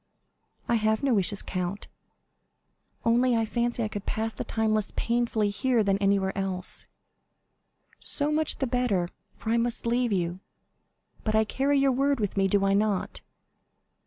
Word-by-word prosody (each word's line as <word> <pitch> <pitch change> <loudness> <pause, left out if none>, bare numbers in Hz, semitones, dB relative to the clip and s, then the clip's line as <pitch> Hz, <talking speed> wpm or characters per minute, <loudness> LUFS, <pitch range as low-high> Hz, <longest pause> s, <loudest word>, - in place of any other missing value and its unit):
"I 235 - +3
have 220 +2 +1
no 270 -3 +3
wishes, 200 -1 +1
count; 185 +2 -4 1.2
only 240 +2 +3
I 225 -1 +1
fancy 240 +1 -1
I - - 0
could 205 -1 -7
pass 225 +1 -2
the - - -5
time 220 -1 0
less 215 -2 0
painfully 230 -3 0
here 240 +2 +1
than 195 -1 +1
anywhere 195 -1 +1
else." 190 -2 0 1.1
"So 290 0 +1
much 310 0 +1
the 270 - 0
better, 235 -8 0 0.3
for 220 - -3
I 230 - +3
must 235 0 -1
leave 240 0 +1
you; 175 -2 -1 0.8
but 215 -1 0
I 220 - +5
carry 275 +6 +1
your 275 0 +4
word 275 +1 +1
with 205 -3 -2
me, 195 -1 +3
do 195 +1 +2
I 195 - +3
not?" 205 -1 0
220 Hz, 160 wpm, -27 LUFS, 200-240 Hz, 1.2 s, I